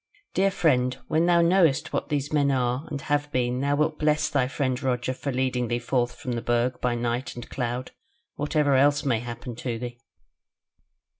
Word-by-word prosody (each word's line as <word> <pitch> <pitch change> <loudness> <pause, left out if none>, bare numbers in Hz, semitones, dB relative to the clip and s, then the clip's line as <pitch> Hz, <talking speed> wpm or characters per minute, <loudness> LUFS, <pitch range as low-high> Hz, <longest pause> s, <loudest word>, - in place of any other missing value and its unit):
"Dear 195 +1 +3
friend, 130 -9 +2
when 160 +2 +2
thou 170 -1 +5
knowest 170 -4 +3
what - - -2
these 145 0 -2
men 145 -2 +3
are 130 +2 0
and 145 - -4
have 145 0 -1
been 125 -1 0
thou 140 +1 +1
wilt 155 +1 0
bless 150 0 +2
thy 140 -5 +1
friend 130 -1 -1
Roger 130 -1 -1
for 140 +2 -4
leading 130 -1 0
thee 120 +1 0
forth 120 0 -1
from 125 - -5
the 120 -1 -2
Burg 120 +2 0
by 125 -1 +1
night 120 +2 -2
and 120 0 -8
cloud, 125 0 -3 0.4
whatever 145 -1 +1
else 145 +2 +3
may 125 -5 +2
happen 120 +1 -7
to 120 -2 -3
thee. 120 0 -7
130 Hz, 190 wpm, -26 LUFS, 125-145 Hz, 0.4 s, thou